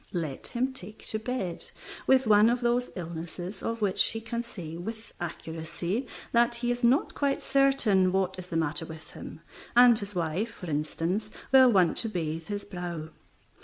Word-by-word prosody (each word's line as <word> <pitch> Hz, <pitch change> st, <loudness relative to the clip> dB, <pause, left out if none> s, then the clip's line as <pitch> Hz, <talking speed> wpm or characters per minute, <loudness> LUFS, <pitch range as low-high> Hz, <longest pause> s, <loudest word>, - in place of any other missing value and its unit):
Let 160 Hz, -7 st, -3 dB
him 255 Hz, +2 st, -1 dB
take 215 Hz, -3 st, -10 dB
to 215 Hz, -, -1 dB
bed 220 Hz, -7 st, -3 dB, 0.4 s
with 265 Hz, 0 st, +5 dB
one 215 Hz, 0 st, +6 dB
of 245 Hz, +1 st, +1 dB
those 240 Hz, +1 st, +1 dB
illnesses 175 Hz, +2 st, -6 dB
of 230 Hz, 0 st, -3 dB
which 195 Hz, -2 st, +3 dB
he 225 Hz, -, -2 dB
can 230 Hz, +1 st, -3 dB
say 180 Hz, -9 st, -8 dB
with 220 Hz, +6 st, -7 dB
accuracy 170 Hz, +7 st, -3 dB, 0.2 s
that 235 Hz, 0 st, +3 dB
he 240 Hz, 0 st, -1 dB
is 245 Hz, +1 st, -3 dB
not 250 Hz, +5 st, +3 dB
quite 280 Hz, -1 st, 0 dB
certain 245 Hz, -9 st, +3 dB
what 190 Hz, 0 st, 0 dB
is 180 Hz, -, -7 dB
the 165 Hz, -, -2 dB
matter 160 Hz, +1 st, 0 dB
with 160 Hz, -1 st, -10 dB
him, -, -, -9 dB, 0.3 s
and 240 Hz, -2 st, +8 dB
his 200 Hz, -1 st, -7 dB
wife, 175 Hz, +6 st, -1 dB
for 180 Hz, -4 st, -6 dB
instance, 165 Hz, +8 st, -1 dB, 0.2 s
will 260 Hz, -2 st, +8 dB
want 185 Hz, -5 st, +4 dB
to 225 Hz, -, -2 dB
bathe 165 Hz, -4 st, -3 dB
his 205 Hz, -1 st, -4 dB
brow. 175 Hz, -5 st, -5 dB
200 Hz, 175 wpm, -28 LUFS, 170-235 Hz, 0.4 s, and